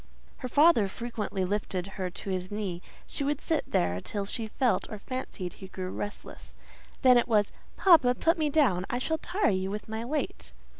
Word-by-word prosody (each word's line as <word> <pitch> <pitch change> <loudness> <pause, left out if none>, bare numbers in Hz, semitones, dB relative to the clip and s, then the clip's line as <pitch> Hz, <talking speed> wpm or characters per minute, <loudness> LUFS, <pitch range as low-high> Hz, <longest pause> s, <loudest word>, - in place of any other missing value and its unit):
Her 255 - -5
father 290 -5 +5
frequently 215 -3 -3
lifted 190 -2 -2
her 190 -1 -4
to 195 +2 -6
his 185 0 -2
knee; 200 -4 -3 0.2
she 285 - -4
would 290 0 0
sit 320 -3 -1
there 90 +1 +1
till 200 -2 -3
she 220 +2 -3
felt 245 +2 0
or 215 - -5
fancied 205 -6 -5
he 190 - -10
grew 185 -1 -5
restless; 205 - -6 0.5
then 250 -1 +8
it - - 0
was—"Papa, 245 - +3
put 330 +5 +2
me 305 -1 +2
down; 255 - +3
I 245 - 0
shall 320 +5 -1
tire 370 - +1
you 190 0 -1
with 210 +1 -5
my 220 +1 -4
weight." 300 +8 -3
215 Hz, 185 wpm, -29 LUFS, 190-275 Hz, 0.5 s, then